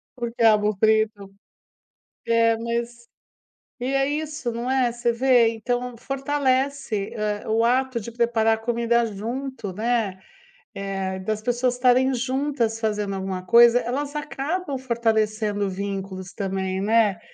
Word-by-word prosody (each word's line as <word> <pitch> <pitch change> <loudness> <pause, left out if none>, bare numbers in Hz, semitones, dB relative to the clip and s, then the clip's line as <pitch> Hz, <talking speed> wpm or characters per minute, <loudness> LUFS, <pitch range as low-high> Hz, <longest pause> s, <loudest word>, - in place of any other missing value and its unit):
O 240 -2 -4
quiabo 215 -3 +3
frito. 215 -2 +1 0.9
É, 230 0 +3
mas 235 +1 -4 0.7
e 245 - -2
é 270 +1 +1
isso 300 -4 -3
não 235 +2 -3
é, 255 -3 +2
você 240 0 0
vê. 245 -1 +4
Então, 245 +2 -3
fortalece 270 -4 -1 0.3
ah - - -5
o 225 +1 +2
ato 255 +1 +1
de 230 - -7
preparar 225 -1 +1
comida 235 0 +1
junto, 230 +1 -5
né, 215 -2 -1 0.6
eh 195 -1 -3
das 215 +3 -3
pessoas 245 +2 0
estarem 255 +1 +3
juntas 255 -2 -1
fazendo 210 -3 -1
alguma 190 -1 -4
coisa 235 +3 +7
elas 280 +5 -3
acabam 295 +1 -3
fortalecendo 220 -4 0
vínculos 190 -1 -5
também, 190 -1 -2
né. 210 -2 +2
235 Hz, 125 wpm, -24 LUFS, 210-255 Hz, 0.9 s, coisa